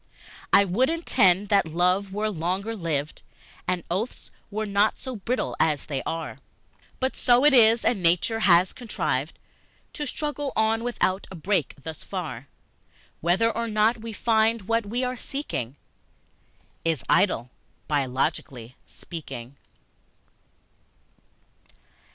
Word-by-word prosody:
I 200 - +6
would 220 +8 +2
indeed 205 - +3
that 200 -4 +3
love 180 +4 +1
were 210 +2 -1
longer 190 +5 -2
lived, 155 -6 -3 0.5
And 180 -2 0
oaths 205 +8 -3 0.2
were 215 +1 -2
not 205 +1 +2
so 260 -3 -6
brittle 240 +5 -2
as 150 -3 +1
they 140 -3 -3
are, 165 0 -4 0.6
But 260 +1 -1
so 245 +2 +4
it 295 - +6
is, 230 -2 +6
and 220 -6 +2
nature 180 +6 +2
has 180 -3 +4
contrived 160 - -2 0.6
To 295 -2 -4
struggle 290 0 -3
on 220 +1 +2
without 200 -5 -1
a 190 - -9
break 180 0 -1
thus 160 0 -7
far, 145 -9 -5 0.7
Whether 185 +8 +2
or 230 +1 -1
not 220 +1 +2
we 230 0 -6
find 225 0 +2
what 230 +1 0
we 240 +5 -1
are 250 0 -1
seeking 185 - -4 1.1
Is 165 -6 0
idle, 170 - +2 0.4
biologically 130 -3 -2
speaking. 135 -6 -9
200 Hz, 125 wpm, -25 LUFS, 165-230 Hz, 1.1 s, I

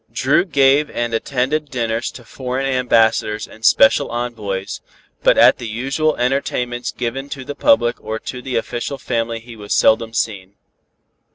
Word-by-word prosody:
Dru 135 +8 +2
gave 140 -2 +3
and 120 -1 -3
attended 140 +6 -1
dinners 115 -2 -2
to 120 - -12
foreign 130 +2 -4
ambassadors 115 -4 +1
and 110 - -16
special 140 +4 +5
envoys, 110 -5 -4 0.4
but - - +4
at - - +6
the 120 - -5
usual 135 +8 -1
entertainments 125 -1 -1
given 130 +3 -4
to 135 -2 -7
the 145 - -5
public 120 -3 +2
or 110 +1 -3
to 125 +3 -7
the 130 0 -5
official 120 +4 -3
family 115 -4 -2
he 115 0 -12
was 105 -2 -3
seldom 115 0 +3
seen. 100 -4 -3
120 Hz, 155 wpm, -19 LUFS, 115-135 Hz, 0.4 s, at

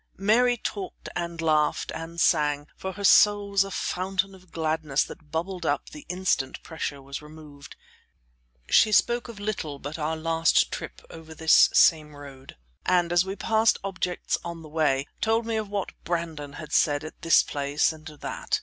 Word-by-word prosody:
Mary 240 +5 +3
talked, 200 -4 -6
and 170 -1 -4
laughed, 155 -2 +1
and 165 +1 -7
sang, 150 -3 +2
for 190 0 -5
her 200 - -8
soul 205 +1 +5
was 195 -1 +4
a 195 - -7
fountain 190 +1 -2
of 185 -2 -18
gladness 155 -3 0
that 150 - -12
bubbled 175 +4 -3
up - - -1
the 300 -2 -11
instant 180 -7 -1
pressure 160 -3 -5
was 140 +1 -7
removed. 150 -2 -13 0.9
She 215 - +5
spoke 240 +3 +2
of 230 -4 -10
little 200 -9 -4
but 145 +4 -7
our 160 +1 -1
last 165 0 +2
trip - - -7
over 160 -1 -11
this 160 0 +6
same 155 -2 +4
road, 140 - -12 0.3
and, 175 -1 +2
as 175 +1 +4
we 190 +1 -4
passed 220 +1 +2
objects 185 -2 -2
on 170 -1 -7
the 155 - -11
way, 150 -3 +1 0.2
told 225 +1 +1
me 225 -1 -2
of 215 -2 -2
what 200 -2 -3
Brandon 165 -4 -4
had 150 0 -9
said 145 0 +2
at 155 - -10
this 165 - +5
place 145 +2 0
and 155 +1 -13
that. 150 -2 -3
165 Hz, 175 wpm, -26 LUFS, 150-195 Hz, 0.9 s, this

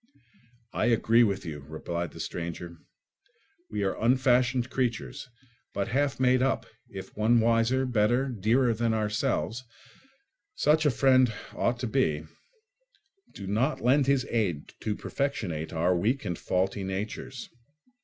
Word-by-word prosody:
"I - - +1
agree 115 0 +4
with 100 -4 0
you," 75 -3 -5
replied 80 +4 -5
the - - -12
stranger; 85 0 -5 0.9
"we 105 -1 -2
are 95 - 0
unfashioned 125 0 +3
creatures, 120 - -2 0.5
but 100 +3 -1
half 140 +3 0
made 130 0 +4
up, 135 +1 +1 0.2
if 95 -1 -9
one 115 +3 +3
wiser, 115 +3 +2
better, 120 +2 +2
dearer 120 +1 +2
than 115 0 0
ourselves—such 135 - -2
a - - +5
friend 130 -1 +4 0.2
ought 120 0 0
to 125 - -1
be—do 315 - -6
not 115 +10 0
lend 135 +3 +3
his 135 -2 +2
aid 95 -11 -1
to 105 - -2
perfectionate 100 - -3
our 85 +2 +1
weak 110 +7 0
and 90 -4 -3
faulty 95 +2 -1
natures. 105 +7 -5
115 Hz, 125 wpm, -28 LUFS, 95-130 Hz, 0.9 s, a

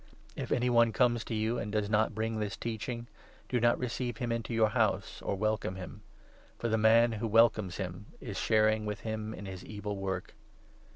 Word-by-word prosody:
If - - -5
any 125 0 +2
one 115 -1 +5
comes 120 -2 +2
to 115 - -3
you 110 +2 0
and 105 - -4
does 105 -1 0
not 110 +1 +3
10 - - -12
bring 110 0 -1
this 105 -2 -3
Teaching, 115 +1 -4 0.4
do 125 - +1
not 120 0 +4
receive 125 -1 -3
him 120 -1 -2
into 115 0 -2
your 110 -2 +3
house - - 0
or - - -1
welcome 110 -2 -1
him; 90 -2 -8 0.6
for 120 - -2
the 110 - +2
man 115 +2 +5
who 110 +1 -2
welcomes 110 -4 +3
him 95 +1 -5
is - - -5
sharing 110 0 +3
with 105 +2 -5
n - - -2
him 110 0 -4
in 105 - -8
his 95 -1 -7
wicked 105 -1 -9
work. 95 -3 -3
110 Hz, 210 wpm, -31 LUFS, 105-115 Hz, 0.6 s, one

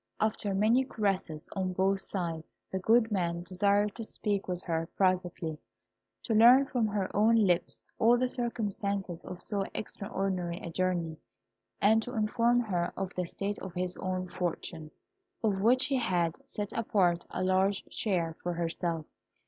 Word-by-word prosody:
After 210 -2 0
many 225 +6 +4
caresses 195 - -2
on 185 -1 -1
both 195 +2 +2
sides, 165 -5 -4 0.2
the 190 - -1
good 225 +3 +3
man 170 -3 -1
desired 200 +3 +2
to 230 - -5
speak 205 -2 -2
with 180 0 -3
her 165 -1 -2
privately, 180 -4 0 0.6
to 225 - -1
learn 240 +5 +8
from 245 -4 0
her 205 -2 -2
own 220 +3 +5
lips 185 -6 +1
all 235 +2 +5
the 255 +1 +1
circumstances 200 -7 -2
of 180 - -6
so 200 -2 0
extraordinary 190 -4 -3
a 170 - -7
journey, 170 -3 -1 0.6
and 220 +2 +5
to 245 +3 -6
inform 230 +3 +2
her 180 -6 -1
of 195 -1 -3
the 180 -1 -2
state 200 +3 -3
of 190 -3 -8
his 180 0 -2
own 185 0 -2
fortune, 170 -3 -4 0.5
of 200 -3 +1
which 250 +5 +4
he 275 -2 +1
had 175 -8 +1
set 205 -1 -4
apart 185 -6 +2
a - - -3
large 190 +1 +2
share 170 -6 0
for 175 - -2
herself. 165 -1 -2
195 Hz, 155 wpm, -30 LUFS, 175-215 Hz, 0.6 s, learn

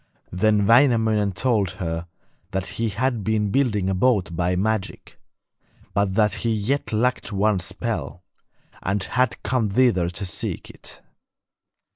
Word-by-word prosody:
Then 105 +2 +2
Wainamoinen 110 -4 +4
told 100 -3 +1
her 85 -2 -3 0.4
that 95 0 -2
he 115 +3 -2
had 115 +2 -1
been 105 -1 0
building 105 -7 +1
a 95 - +1
boat 95 -4 +1
by 90 +2 0
magic, 105 +1 -2 0.7
but 100 -2 +1
that 105 -1 +3
he 115 - +1
yet 110 +7 -1
lacked 120 +2 0
one 100 0 +2
spell, 90 +1 -4 0.6
and 95 0 -1
had 125 +2 0
come 115 -4 0
thither 95 -6 +3
to 95 +3 -4
seek 90 - -4
it. - - -9
105 Hz, 135 wpm, -23 LUFS, 95-115 Hz, 0.7 s, Wainamoinen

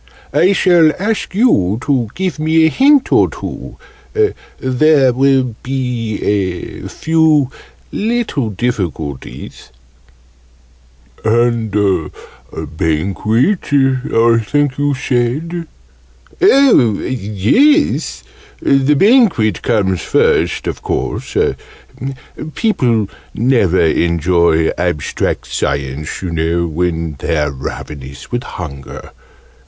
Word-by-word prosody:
"I 185 +3 +4
shall 175 -5 +4
ask 205 -1 -2
you 110 - +2
to 130 -6 0
give 185 -5 -2
me 160 +1 +3
a - - +4
hint 280 - +3
or - - +4
two - - -8 0.8
there 130 0 +3
will 130 -2 +2
be 125 -5 -3
a 95 -4 -2
few 160 -4 +2 0.4
little 220 - -1
difficulties 90 - -5 0.8
" - - -31
"And 115 0 +1 0.8
Banquet, 100 - -1 0.5
I 115 0 +4
think 145 +5 0
you 145 -1 +1
said?" 140 +7 -2 0.7
"Oh, 270 - +5
yes! 130 - +1 0.4
The 140 +1 +2
Banquet 190 - +3
comes 100 -6 0
first, - - +1
of - - -4
course. - - -3 1.2
People 120 - +1 0.3
never 115 -7 +2
enjoy 85 0 +2
Abstract 85 -5 -2
Science, 70 +5 -3
you 90 - -3
know, 85 +1 0
when 80 -2 -2
they're 75 -2 -1
ravenous 70 +1 -8
with 120 - -1
hunger. 70 - -8
115 Hz, 90 wpm, -15 LUFS, -, 1.2 s, Oh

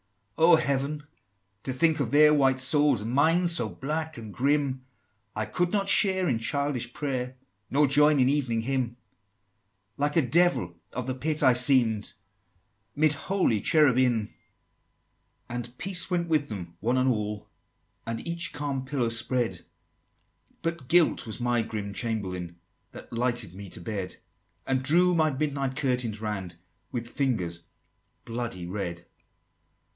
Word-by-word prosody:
XXIII. 160 +10 +3
"Oh, - - +9
Heaven! 140 0 -1 0.6
to 130 - -4
think 155 +4 +2
of 135 -6 -1
their 150 +3 +6
white 135 -3 +3
souls, 140 -3 +3
And 115 - -4
mine 165 +6 +3
so 165 -10 +1
black 155 - -4
and 110 -3 -9
grim! 140 -1 0 0.5
I 110 0 -1
could 175 - -1
not 200 -2 0
share 190 -3 +3
in 120 -6 0
childish 130 0 -1
prayer, 130 -3 -3 0.3
Nor 145 +2 +3
join 150 +1 +4
in 130 - +4
Evening 130 -5 0
Hymn: 125 -1 -2 1.0
Like 145 +1 0
a 165 - +4
Devil 130 - +2 0.2
of 125 0 -3
the 130 - -2
Pit 150 +4 -1
I 130 -2 +6
seem'd, 120 -4 +3 0.8
'Mid 155 0 +3
holy 155 - 0
Cherubim!" 130 -8 +3
XXIV. - - -25 1.2
"And 120 0 -6
peace 185 -2 +1
went 175 -2 0
with 155 -3 +1
them, 90 -5 -7
one 120 +5 0
and 130 +1 +2
all, 105 -4 -2 0.6
And 115 +7 -4
each 170 +2 -1
calm 140 -2 -3
pillow 130 -3 -1
spread: 115 -5 -1 1.0
But 165 -5 -3
Guilt 170 -6 +3
was 110 - -6
my 120 -1 +1
grim 105 -2 -5
Chamberlain 95 -7 -4 0.4
That - - -11
lighted 120 -5 0
me 100 +1 -9
to - - -6
bed; 95 0 -5 0.5
And 130 -1 0
drew 175 +7 +3
my 160 -2 +3
midnight 140 -2 -2
curtains 125 -6 -1
round, 95 -5 -4 0.4
With 120 -2 -4
fingers 95 -12 -2 0.6
bloody 115 -6 -4
red!" 85 -2 -5
130 Hz, 145 wpm, -27 LUFS, 115-150 Hz, 1.2 s, Oh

